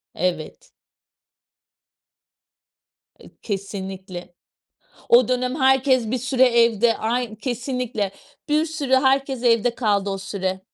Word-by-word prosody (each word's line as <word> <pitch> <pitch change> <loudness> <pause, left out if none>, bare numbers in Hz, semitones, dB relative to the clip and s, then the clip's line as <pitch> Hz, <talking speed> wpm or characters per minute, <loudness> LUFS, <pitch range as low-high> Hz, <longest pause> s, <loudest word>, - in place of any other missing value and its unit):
Evet. 175 -3 -3 2.5
E, - - -15
kesinlikle. 190 -3 -6 0.8
O 240 -1 +6
dönem 255 +1 -1
herkes 260 -3 +3
bir 255 - 0
süre 255 +1 +1
evde 235 -2 +3
Ay, 230 0 -2
kesinlikle. 245 -4 -3 0.4
Bir 305 +2 +2
sürü, 300 -5 -3
herkes 265 -1 +1
evde 235 0 +2
kaldı 205 -4 0
o 195 - -3
süre. 190 -1 -4
235 Hz, 100 wpm, -22 LUFS, 200-255 Hz, 2.5 s, O